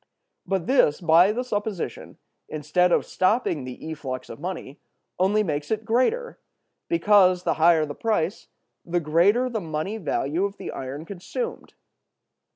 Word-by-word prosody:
But 190 -3 -1
this, 250 - +3
by 175 +2 +5
the 245 +4 -2
supposition, 205 -6 -4 0.3
instead 175 +4 +1
of - - +2
stopping 185 - 0
the 125 -1 -7
efflux 135 -4 -6
of - - -10
money, 170 -4 -6 0.4
only 205 +3 +3
makes 150 -5 -3
it 220 0 -2
greater; 440 - 0 0.5
because, 200 - +4
the - - +1
higher 165 -2 +5
the 145 - -6
price, 205 -2 -1 0.4
the 175 0 -1
greater 175 +11 +3
the 230 -4 -3
money 160 +5 -3
value 160 -1 -1
of 200 0 -5
the - - -6
iron 135 +4 -6
consumed. 205 - -6
180 Hz, 145 wpm, -24 LUFS, 155-215 Hz, 0.5 s, by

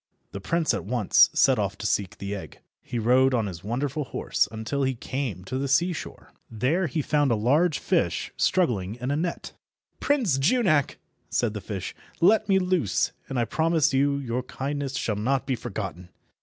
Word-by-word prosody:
The 100 - -7
Prince 165 - +1
at - - -2
once 110 -1 +4
set - - +4
off - - -2
to - - -7
seek 100 -3 -1
the 100 +1 -5
egg. 100 - -8 0.2
He 120 - -5
rode 125 +3 +3
on 115 -3 +1
his 90 -3 -7
wonderful 135 +7 -2
horse 105 - 0
until 110 +5 -3
he 130 -1 0
came 120 -6 -4
to 130 +8 -4
the 140 - -1
seashore. 170 +5 -1 0.2
There 140 - 0
he 155 +1 -2
found 145 -1 +2
a 115 - +3
large 145 +10 +2
fish - - 0
struggling 110 - +1
in 125 +2 -3
a - - +1
net. 170 +3 -3 0.5
"Prince 235 - +1
Junak," 155 - +2 0.3
said 115 -3 0
the 105 - -5
fish, 95 -1 -5 0.3
"let 215 +4 +4
me 195 - +5
loose, 180 - +1 0.2
and 135 - -3
I 120 - +2
promise 160 +1 +1
you 140 +1 +2
your 125 -3 -2
kindness 135 +1 -4
shall 110 -4 -1
not 130 +6 0
be 130 - 0
forgotten." 90 -5 -6
130 Hz, 185 wpm, -26 LUFS, 110-155 Hz, 0.5 s, me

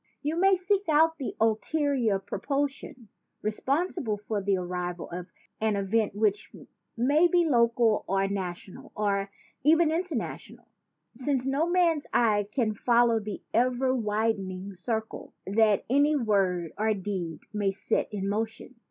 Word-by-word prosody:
You 300 +3 -1
may 385 +3 +4
seek 380 0 0
out 320 +1 +4
the 270 - -4
ul 220 -1 +3
terior 255 -9 0
propulsion 275 -5 -3 0.3
responsible 265 - -1
for 210 0 -3
the 195 0 +1
arrival 180 -1 -4
of 180 +1 -6 0.3
an 220 -1 +1
event 200 +1 0
which 210 0 0 0.5
may 290 +8 +4
be 345 0 +3
local 235 -5 +3
or 195 0 +1
national 190 -2 -6
or 200 -1 0 0.3
even 320 +3 +4
international, 330 -7 -4 0.5
since 265 -1 -1
no 280 +5 +1
man's 340 -4 +2
eye 210 -4 +3
can 225 -4 0
follow 235 +1 +3
the 210 -2 -7
ever 255 +2 +2
widening 210 -4 -2
circle 220 +4 -4
that 210 +1 +2
any 285 +4 +3
word 195 - +1
or 215 0 +2
deed 185 -5 -4
may 205 -2 +1
set 195 +4 -1
in 195 -2 -3
motion. 220 +4 -3
225 Hz, 135 wpm, -27 LUFS, 200-280 Hz, 0.5 s, may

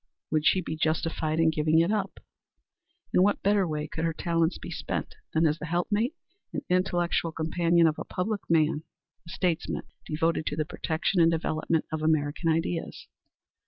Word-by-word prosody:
Would 155 -1 +2
she 185 - +4
be 160 - -4
justified 155 0 0
in 165 -1 +4
giving 155 +1 +2
it 170 +4 +4
up? 205 -3 -1 1.0
In - - +5
what 205 +2 +2
better 200 -2 +3
way 150 -1 -3
could 160 - -5
her 165 -1 0
talents 165 0 0
be - - -8
spent - - -4 0.2
than 160 +1 +2
as 155 +1 +1
the 155 - -5
helpmate 205 - 0 0.4
and - - -4
intellectual 175 -2 +1
companion 165 +1 +2
of 155 -1 +1
a - - -3
public 200 +3 -2
man 155 -2 +3 0.5
a - - -9
statesman 175 -2 -1 0.2
devoted 160 +1 0
to - - -1
the 155 0 -1
protection 160 +4 0
and 165 - +6
development 160 -1 0
of 155 -1 -2
American 155 +1 +1
ideas? 165 +1 -1
165 Hz, 170 wpm, -28 LUFS, 155-175 Hz, 1.0 s, and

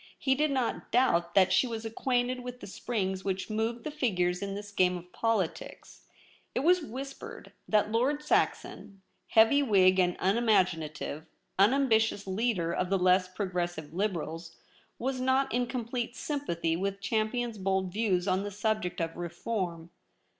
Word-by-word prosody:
He 265 - +2
did 300 +3 +1
not 260 -4 -2
doubt 175 -9 +2
that 190 -1 +5
she 255 - +4
was 225 -1 -5
acquainted 245 +2 0
with 250 0 -7
the - - -9
springs 190 -3 -3
which 190 +2 -3
moved 225 +2 -2
the 305 - -4
figures 180 -11 0
in 200 0 -3
this 205 0 -7
game 180 -2 +2
of 180 +1 -13
politics. 225 -7 -2 0.5
It - - +1
was 355 +4 +4
whispered 270 0 -8 0.2
that 210 0 +2
Lord 270 +6 +1
Saxon, 200 -8 -1 0.2
heavy 225 +6 +5
Whig 190 -7 +4
and 180 -1 +2
unimaginative, 180 -8 0 0.3
unambitious 220 -2 +3
leader 190 -4 0
of 185 - -1
the 195 - +2
less 185 0 +3
progressive 175 -5 -4
Liberals, 170 -3 -3 0.4
was 260 +1 -2
not 260 0 +1
in 245 0 +1
complete 240 -1 -3
sympathy 170 - -2
with 195 +3 -2
Champion's 220 +2 -1
bold 190 -1 -1
views 195 -4 +1
on 185 0 +2
the 205 - -4
subject 205 -3 -2
of 165 0 -3
reform. 175 -1 -4
205 Hz, 150 wpm, -29 LUFS, 180-245 Hz, 0.5 s, that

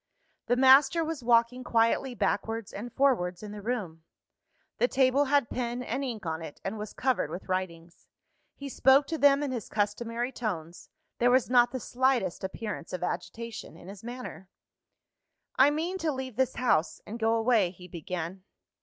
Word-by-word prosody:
The 245 - +3
master 270 +6 +6
was 315 -5 -4
walking 235 +1 +3
quietly 240 +2 +1
backwards 225 -2 -2
and 235 +4 -6
forwards 215 -10 +1
in 210 - -7
the 210 0 -8
room: 195 -8 -4 0.8
the 245 - +4
table 265 +2 +3
had 285 -3 +2
pen 245 +1 -3
and 270 +3 -3
ink 235 -7 -5
on 160 0 -3
it, 160 -3 -9
and 210 +3 -4
was 210 0 -6
covered 255 - 0
with 175 +4 -7
writings. 175 -2 -4 0.5
He 280 - -7
spoke 270 +1 +4
to 320 +1 -4
them 285 0 +5
in 280 - -2
his 235 -5 -5
customary 230 +4 -2
tones; 175 -9 -5 0.3
there 245 - +4
was 250 0 +3
not 245 -1 +6
the 260 - -3
slightest 245 -8 0
appearance 190 -2 -5
of 180 - -3
agitation 225 0 -5
in 175 - -12
his 200 +1 -11
manner. 240 -5 -8 1.1
"I 265 +2 +6
mean 335 +6 -2
to 325 -3 0
leave 260 -3 -5
this 260 0 0
house, 210 -10 +1
and 225 +3 -7
go 225 0 +2
away," 225 -4 +3
he 180 0 -13
began. 175 +2 -6
235 Hz, 170 wpm, -28 LUFS, 190-260 Hz, 1.1 s, master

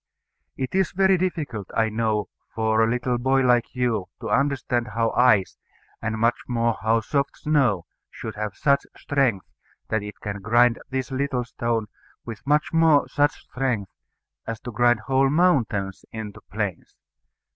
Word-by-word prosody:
It 130 - -3
is 190 -2 +1
very 190 0 +4
difficult, 155 - -2
I 110 -1 +3
know, 110 -1 0 0.3
for 110 0 +2
a 110 - +2
little 125 0 0
boy 135 +2 +2
like 125 -1 +2
you 120 -6 0
to - - -4
understand 135 -4 +1
how 115 0 +1
ice, 120 -6 +3 0.4
and 110 0 -2
much 115 +2 +2
more 115 -2 +1
how 110 +2 +2
soft 140 +4 -1
snow, 130 - +1 0.2
should - - -7
have 105 -2 -4
such 140 0 +2
strength 130 - 0 0.4
that 110 - 0
it 105 0 -8
can 100 -1 -5
grind 120 +3 +3
this 130 0 -3
little 130 -2 -1
stone, 115 -2 -2 0.6
much 150 +2 +2
more 160 -3 +4
such 145 0 +1
strength 120 -8 -2 0.6
as 115 -2 -4
to 120 - -6
grind 120 0 +3
whole 135 +3 +2
mountains 125 - +1
into 110 -2 -7
plains. 100 -5 -4
120 Hz, 150 wpm, -24 LUFS, 110-135 Hz, 0.6 s, very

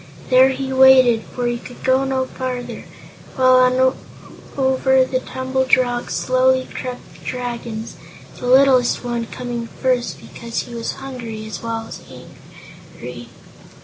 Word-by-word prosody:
There 260 +1 +7
he 265 0 -3
waited, 260 -3 +6
for 245 +2 -5
he 240 0 -1
could 245 - -12
go 260 +1 +3
no 265 -1 0
farther, 255 -1 -6 0.5
while 255 -1 +5
on 255 +1 +4 0.6
over 265 -1 +3
the 255 0 -1
tumbled 260 0 +1
rocks 245 -1 -2
slowly 255 0 +2
crept 250 -1 -7
the - - -19
Dragons 235 -3 -5 0.4
the 245 - -5
littlest 260 -1 +4
one 240 -1 -3
coming 240 -1 -5
first 250 0 -1
because 230 -1 -5
he 240 - -11
was 230 -1 -3
hungry 235 -5 -7
as 215 -5 -7
well 230 -1 -3
as - - -9
angry. - - -13
255 Hz, 140 wpm, -20 LUFS, 240-260 Hz, 0.6 s, There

